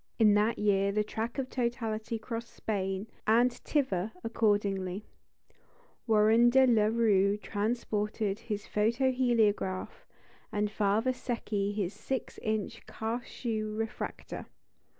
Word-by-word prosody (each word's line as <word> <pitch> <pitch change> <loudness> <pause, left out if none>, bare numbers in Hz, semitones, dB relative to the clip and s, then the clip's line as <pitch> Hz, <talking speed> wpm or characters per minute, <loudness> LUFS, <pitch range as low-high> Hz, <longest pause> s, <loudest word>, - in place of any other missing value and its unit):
In 215 -3 +6
that 210 +3 +2
year 200 -1 +2
the 210 +1 +1
track 225 +4 -4
of 270 -2 -1
totality 230 -3 -2
crossed 230 +1 -6
Spain, 195 -2 -2 0.2
and 240 +3 +4
thither, 235 - -1
accordingly, 205 -4 0 1.0
Warren 220 +2 +5
de 265 +2 +6
la 225 -4 +4
Rue 210 -3 +3
transported 210 0 -2
his 210 -3 -4
photo 230 +5 +2
heliograph, 220 -7 0 0.4
and 210 0 0
Father 215 +4 +2
Secchi 225 -5 -2
his 205 -2 -2
six 265 -3 -4
inch 215 -2 -2
Cauchoix 230 0 -3
refractor. 215 +1 -5
215 Hz, 110 wpm, -30 LUFS, 205-235 Hz, 1.0 s, In